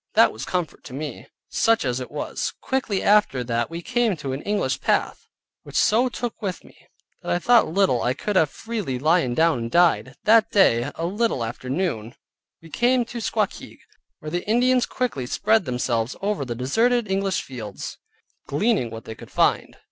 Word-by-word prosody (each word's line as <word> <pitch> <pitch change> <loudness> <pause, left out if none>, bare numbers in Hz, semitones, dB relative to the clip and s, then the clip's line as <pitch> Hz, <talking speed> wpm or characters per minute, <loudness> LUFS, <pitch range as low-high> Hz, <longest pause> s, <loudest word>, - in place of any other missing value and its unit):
That - - +6
was - - -6
comfort 180 -3 -3
to 130 - -8
me, 145 -3 -6 0.2
such 225 -8 +2
as 125 0 -1
it 125 - -6
was. 150 - -3
Quickly 255 -7 -1
after 205 -12 +3
that 120 -1 -1
we 170 +1 -6
came 240 -6 +1
to 140 -3 -4
an 135 - -4
English 205 0 -1
path, - - 0 0.3
which - - -13
so 240 +4 +3
took 240 -1 -5
with 190 -4 -4
me, - - -18 0.5
that - - -4
I - - +3
thought 195 - +3
I 125 +1 0
could 210 +7 -3
have 160 -5 +4
freely 210 - -4
lyen 150 -2 +2
down 160 -5 +3
and 115 0 -4
died. 170 -5 +3
That 220 0 +5
day, 135 - +3
a 165 - -3
little 205 - 0
after 120 +3 -6
noon, 130 - -2 0.5
we 165 - -14
came 245 - +2
to 235 +1 -7
Squakeag, - - -2 0.4
where 155 - -8
the 175 0 -2
Indians 245 +3 +3
quickly 210 - -2
spread 215 - +2
themselves 125 -1 -1
over 200 -7 -1
the 120 -2 -4
deserted 225 - +1
English 195 -1 0
fields, 110 -6 -7 0.5
gleaning 155 - +1
what 115 0 -9
they 110 - -6
could - - -13
find. - - +1
175 Hz, 180 wpm, -23 LUFS, -, 0.5 s, That